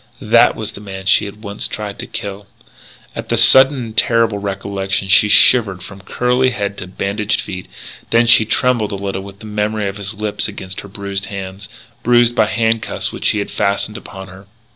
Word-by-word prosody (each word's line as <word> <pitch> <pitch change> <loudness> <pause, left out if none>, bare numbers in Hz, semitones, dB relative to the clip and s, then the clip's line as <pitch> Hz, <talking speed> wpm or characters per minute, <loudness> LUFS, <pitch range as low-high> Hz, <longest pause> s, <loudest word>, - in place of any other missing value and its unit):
That - - +4
was - - -5
the - - -11
man 95 -2 -8
she 95 - +4
had 105 +2 -10
once 100 -1 -3
tried 105 -2 -6
to - - -5
kill! 100 0 -6 0.7
At - - -7
the - - +1
sudden 135 +2 +6
and 115 -4 -6
terrible 115 -4 +2
recollection 100 -1 -3
she 105 +2 +6
shivered 100 -4 +4
from 100 0 -11
curly 125 +5 +1
head 100 -5 -3
to 90 - -7
bandaged 100 +3 -2
feet. 95 -1 -6 0.4
Then 115 +1 +3
she 115 -1 +6
trembled 115 0 0
a - - -3
little 100 -1 -4
with 100 0 -12
the - - -10
memory 105 0 -2
of 100 +1 -5
his 100 +1 -5
lips 105 0 -1
against 95 -3 -7
her - - -11
bruised 100 0 -5
hands 95 0 -8 0.3
bruised 120 0 +4
by 110 -3 +2
handcuffs 115 0 0
which - - -1
he - - 0
had 100 - -3
fastened 100 +1 -1
upon 95 -2 -9
her. 95 +1 -14
100 Hz, 195 wpm, -17 LUFS, 100-110 Hz, 0.7 s, sudden